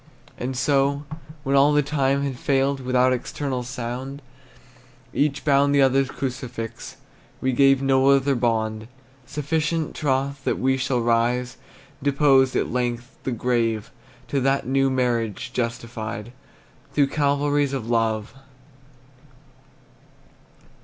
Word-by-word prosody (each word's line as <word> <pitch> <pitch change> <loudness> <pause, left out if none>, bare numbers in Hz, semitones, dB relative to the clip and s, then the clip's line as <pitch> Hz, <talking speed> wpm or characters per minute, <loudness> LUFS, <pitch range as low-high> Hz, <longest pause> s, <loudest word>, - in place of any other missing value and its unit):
And 130 +1 -4
so, 140 +1 +1 0.4
when 135 -1 +1
all 140 +2 +5
the 150 0 +3
time 140 -1 +1
had 135 -3 -3
failed, 135 0 +1
Without 130 0 +2
external 130 +1 -3
sound, 125 +3 -6 0.9
Each 140 -2 0
bound 140 0 +4
the 140 - +5
other's 135 0 +3
crucifix, 120 -4 -6 0.4
We 130 - 0
gave 135 +1 +4
no 135 0 +3
other 140 0 +4
bond. 110 -3 -1 0.4
Sufficient 150 +2 -1
troth 140 -1 -1
that - - 0
we 130 0 +2
shall 130 -2 0
rise 120 +2 +1 0.4
Deposed, 135 -2 +3
at - - 0
length, 120 0 -2
the 130 - -1
grave 115 -2 -1 0.4
To 140 - 0
that 135 +1 +1
new 135 +1 +2
marriage, 120 -2 -1
justified 115 -2 -4 0.6
Through 145 -1 +4
Calvaries 145 -1 +1
of 130 -5 -4
Love! 115 -2 0
130 Hz, 120 wpm, -23 LUFS, 120-140 Hz, 0.9 s, all